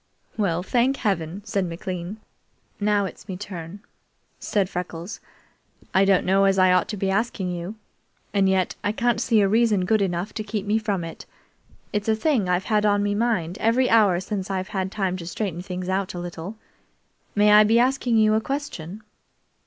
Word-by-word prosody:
"Well 180 Hz, -5 st, 0 dB
thank 250 Hz, +7 st, +1 dB
heaven!" 190 Hz, -4 st, -2 dB
said 195 Hz, -2 st, -1 dB
McLean. 180 Hz, +3 st, -5 dB, 0.6 s
"Now 205 Hz, -1 st, +2 dB
it's 190 Hz, -, -9 dB
me 185 Hz, -, -4 dB
turn," 185 Hz, -1 st, -8 dB, 0.6 s
said 200 Hz, -4 st, 0 dB
Freckles. 180 Hz, +1 st, -6 dB, 0.7 s
"I 190 Hz, +1 st, +5 dB
don't 195 Hz, -2 st, +3 dB
know 195 Hz, +1 st, +4 dB
as 195 Hz, 0 st, +3 dB
I 185 Hz, -1 st, +5 dB
ought 185 Hz, -, +2 dB
to 210 Hz, -, -5 dB
be 195 Hz, 0 st, 0 dB
asking 195 Hz, -3 st, -1 dB
you, 175 Hz, +4 st, -5 dB, 0.6 s
and 195 Hz, -2 st, +3 dB
yet 190 Hz, -1 st, +1 dB
I 205 Hz, -, 0 dB
can't 235 Hz, 0 st, +1 dB
see 225 Hz, -3 st, +3 dB
a 200 Hz, -, +4 dB
reason 215 Hz, -3 st, +3 dB
good 215 Hz, +2 st, +2 dB
enough 180 Hz, +1 st, -2 dB
to 215 Hz, -, -4 dB
keep 210 Hz, -1 st, -4 dB
me 210 Hz, +2 st, +2 dB
from 205 Hz, -5 st, -2 dB
it. 165 Hz, -1 st, -8 dB, 0.7 s
It's 210 Hz, +1 st, -1 dB
a 220 Hz, -, +4 dB
thing 220 Hz, -, +1 dB
I've 180 Hz, +1 st, +1 dB
had 210 Hz, -1 st, +2 dB
on 205 Hz, -1 st, +3 dB
me 205 Hz, 0 st, 0 dB
mind 205 Hz, -6 st, -1 dB
every 245 Hz, +3 st, +2 dB
hour 205 Hz, -6 st, +5 dB
since 190 Hz, 0 st, -4 dB
I've 190 Hz, 0 st, -2 dB
had 190 Hz, -3 st, -2 dB
time 190 Hz, -3 st, -1 dB
to 170 Hz, -2 st, -8 dB
straighten 180 Hz, -2 st, -3 dB
things 180 Hz, -1 st, -5 dB
out 190 Hz, 0 st, -1 dB
a -, -, -4 dB
little. 175 Hz, +3 st, -6 dB, 0.8 s
May 210 Hz, 0 st, +5 dB
I 210 Hz, 0 st, +8 dB
be 220 Hz, +2 st, +3 dB
asking 250 Hz, -1 st, +2 dB
you 215 Hz, -1 st, +4 dB
a 220 Hz, -, +2 dB
question?" 220 Hz, -, -5 dB
200 Hz, 190 wpm, -24 LUFS, 185-215 Hz, 0.8 s, I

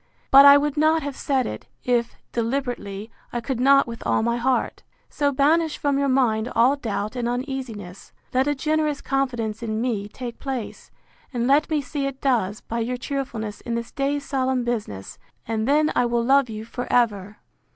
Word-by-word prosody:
But 275 Hz, +1 st, +9 dB
I 280 Hz, 0 st, +10 dB
would 295 Hz, 0 st, -1 dB
not 315 Hz, +1 st, +3 dB
have 285 Hz, -1 st, -4 dB
said 265 Hz, -3 st, 0 dB
it, -, -, -6 dB, 0.2 s
if, 240 Hz, -1 st, 0 dB, 0.2 s
deliberately, 230 Hz, -4 st, -3 dB, 0.2 s
I 240 Hz, -, -2 dB
could 240 Hz, +1 st, -3 dB
not 275 Hz, +2 st, +5 dB
with 230 Hz, -1 st, -8 dB
all -, -, +1 dB
my 235 Hz, +1 st, +1 dB
heart. 255 Hz, +2 st, 0 dB, 0.3 s
So 285 Hz, -1 st, +1 dB
banish 305 Hz, +4 st, +2 dB
from 285 Hz, -1 st, 0 dB
your 280 Hz, -1 st, +1 dB
mind 240 Hz, -3 st, +1 dB
all 245 Hz, +5 st, +5 dB
doubt 215 Hz, -4 st, -3 dB
and 240 Hz, -1 st, -1 dB
uneasiness; 245 Hz, -7 st, -5 dB, 0.2 s
let 260 Hz, +2 st, +2 dB
a 290 Hz, -, +1 dB
generous 305 Hz, 0 st, 0 dB
confidence 240 Hz, -5 st, -2 dB
in 220 Hz, -2 st, -2 dB
me 225 Hz, -4 st, -1 dB
take 240 Hz, +2 st, -8 dB
place; 260 Hz, -5 st, -5 dB, 0.4 s
and 240 Hz, -3 st, -1 dB
let 280 Hz, +4 st, +3 dB
me 310 Hz, -2 st, +1 dB
see 275 Hz, +2 st, -3 dB
it 275 Hz, -1 st, -6 dB
does, 220 Hz, -7 st, 0 dB
by 230 Hz, -, -4 dB
your 245 Hz, +2 st, -2 dB
cheerfulness 245 Hz, -6 st, -4 dB
in 235 Hz, -, -3 dB
this 235 Hz, 0 st, -4 dB
day's 280 Hz, 0 st, -1 dB
solemn 260 Hz, -3 st, 0 dB
business; 210 Hz, -, -4 dB, 0.3 s
and 220 Hz, 0 st, -1 dB
then 305 Hz, +2 st, +3 dB
I 245 Hz, -, +3 dB
will 235 Hz, 0 st, 0 dB
love 275 Hz, -1 st, +4 dB
you 215 Hz, 0 st, -6 dB
for 245 Hz, +2 st, -6 dB
ever! 210 Hz, -4 st, +1 dB
250 Hz, 185 wpm, -23 LUFS, 230-275 Hz, 0.4 s, I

